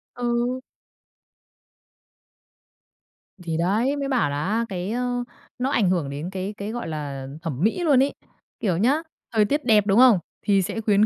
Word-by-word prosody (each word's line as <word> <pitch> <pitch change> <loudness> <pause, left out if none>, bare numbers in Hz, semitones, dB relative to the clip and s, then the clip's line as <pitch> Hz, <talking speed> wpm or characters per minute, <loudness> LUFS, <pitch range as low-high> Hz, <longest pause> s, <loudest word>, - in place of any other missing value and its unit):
Ừ. 245 +1 0 2.8
Thì 165 -2 -2
đấy! 215 - +1
Mới 280 -1 -2
bảo 250 - +1
là 145 +3 -2
á, 225 +3 +1
cái, 185 +2 -3
ơ, 245 0 -1 0.4
nó 260 +2 0
ảnh 200 -9 +3
hưởng 170 -7 0
đến 145 +5 -5
cái 190 +2 -4
cái, 205 +2 -4
gọi 240 -7 -4
là 140 -4 -5
thẩm 160 -2 -3
mỹ 225 +11 +1
luôn 275 -5 +5
ấy. 280 - -1 0.5
Kiểu 185 -6 0
nhá, 270 - +3 0.3
thời 215 -2 +3
tiết 290 +6 -1
đẹp, 215 -4 +5
đúng 200 +4 +4
không? 245 -8 +7 0.2
Thì 200 -2 +3
sẽ 225 +5 -3
khuyến 210 0 +4
210 Hz, 170 wpm, -24 LUFS, 180-245 Hz, 2.8 s, không